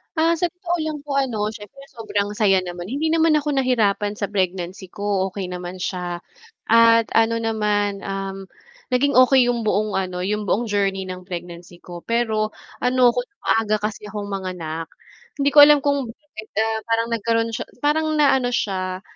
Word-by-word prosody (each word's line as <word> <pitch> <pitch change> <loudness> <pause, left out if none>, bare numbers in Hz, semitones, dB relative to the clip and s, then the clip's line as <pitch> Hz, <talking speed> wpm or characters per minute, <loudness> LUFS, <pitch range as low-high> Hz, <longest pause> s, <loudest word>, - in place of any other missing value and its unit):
Ah, 325 +1 +3
sa 350 - +2
totoo 350 0 -3
lang 310 -1 -3
po 280 -1 -2
ano, 220 -6 -1
siyempre 215 +5 -12
sobrang 205 -3 -2
saya 195 -3 +3
naman, 175 0 -7
hindi 295 +7 -1
naman 325 -1 +3
ako 300 0 0
nahirapan 215 -5 +1
sa 205 -1 -4
pregnancy 185 -1 -2
ko, 200 0 -1
okay 190 -1 -5
naman 180 0 -6
siya. 175 -2 -3 0.5
At 230 0 +5
ano 225 0 +3
naman, 210 -2 0
um, 195 0 -5 0.5
naging 280 +3 +2
okey 255 -1 +6
yung 235 -2 -3
buong 210 -1 0
ano, 185 -1 -3
yung 210 +2 -2
buong 225 - +1
journey 195 -2 0
ng 185 -1 -8
pregnancy 175 -1 -8
ko, 175 -1 -9
pero 220 -2 0 0.3
ano 250 -1 +4
ko 245 - -2 0.2
maaga 220 -1 +2
kasi 210 0 -4
akong 205 0 -6
manganak, 175 -4 -4 0.5
hindi 280 0 +2
ko 295 - +6
alam 295 -1 +5
kung 280 -3 0
bakit, 225 -4 -12
ah, 220 0 0
parang 230 0 +1
nagkaro'n 230 0 0
siya - - -3 0.2
parang 310 +2 +2
naano 270 -4 +3
siya, 185 -4 -2
215 Hz, 170 wpm, -22 LUFS, 195-250 Hz, 0.5 s, okey